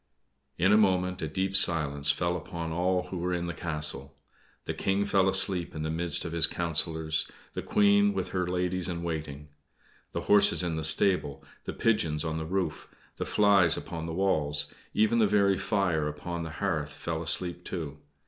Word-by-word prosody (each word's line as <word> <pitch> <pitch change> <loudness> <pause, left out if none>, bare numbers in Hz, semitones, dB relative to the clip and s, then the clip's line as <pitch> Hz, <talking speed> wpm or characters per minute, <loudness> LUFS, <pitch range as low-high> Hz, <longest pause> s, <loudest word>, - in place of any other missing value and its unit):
In 95 +4 +3
a 105 - +6
moment 90 -2 +1
a 80 - -2
deep 95 +5 -2
silence 75 -6 +2
fell 85 +4 0
upon 85 -1 -5
all 90 +2 0
who 90 - -5
were 90 +1 -1
in 85 0 -3
the 85 - -4
castle. 75 -2 -4 0.5
The - - -3
King 100 +1 0
fell 95 -2 +2
asleep 95 -3 +2
in 75 - -4
the 80 - -2
midst 85 0 -1
of 85 - -4
his 80 -1 +4
councillors, 80 -1 -1 0.2
the - - -4
Queen 205 0 +3
with - - -3
her 90 -2 -2
ladies 90 0 -1
in 85 -1 -4
waiting. 75 -3 -5 0.6
The - - -2
horses 105 -2 +4
in 85 -2 -2
the 80 - -3
stable, 80 -3 +2 0.2
the - - -4
pigeons 85 -10 0
on 80 0 -2
the 80 - -5
roof, 90 -4 -3 0.3
the - - -4
flies 100 -5 +4
upon 80 -1 -6
the 80 - -5
walls, 75 -6 +1 0.3
even 110 +2 +3
the 110 - +4
very 100 -1 +3
fire 90 -6 0
upon 85 +4 -5
the 80 - -5
hearth 75 -2 -2
fell 80 -1 -4
asleep, 85 +2 +1
too. 75 -6 -6
85 Hz, 185 wpm, -28 LUFS, 80-95 Hz, 0.6 s, a